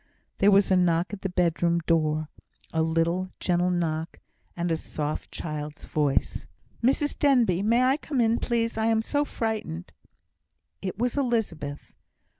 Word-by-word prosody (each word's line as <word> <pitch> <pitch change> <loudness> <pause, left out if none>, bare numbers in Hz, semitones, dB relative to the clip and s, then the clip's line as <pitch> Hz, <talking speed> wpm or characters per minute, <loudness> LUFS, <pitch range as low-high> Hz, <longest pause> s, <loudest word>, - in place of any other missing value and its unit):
There 200 - +5
was 200 -1 +4
a - - +6
knock 175 +1 +2
at 200 - -6
the 195 - -2
bedroom 170 -1 +1
door 155 -2 +1 0.5
a 160 - +2
little, 165 +3 +1
gentle 180 0 +1
knock, 165 -2 -2 0.4
and 170 0 -1
a - - +3
soft 155 -1 -4
child's 150 -1 -6
voice. 145 -3 0 0.4
"Mrs 275 +4 +1
Denbigh, 240 -11 +3
may 230 +4 +3
I 265 +2 +3
come 295 -3 -3
in, 230 0 +3
please? 230 -2 -1
I 220 - +2
am 225 -1 +2
so 290 +5 +1
frightened!" 220 - -4 0.9
It 190 -1 -4
was 245 +4 -1
Elizabeth. 195 - -2
180 Hz, 150 wpm, -26 LUFS, 160-230 Hz, 0.9 s, a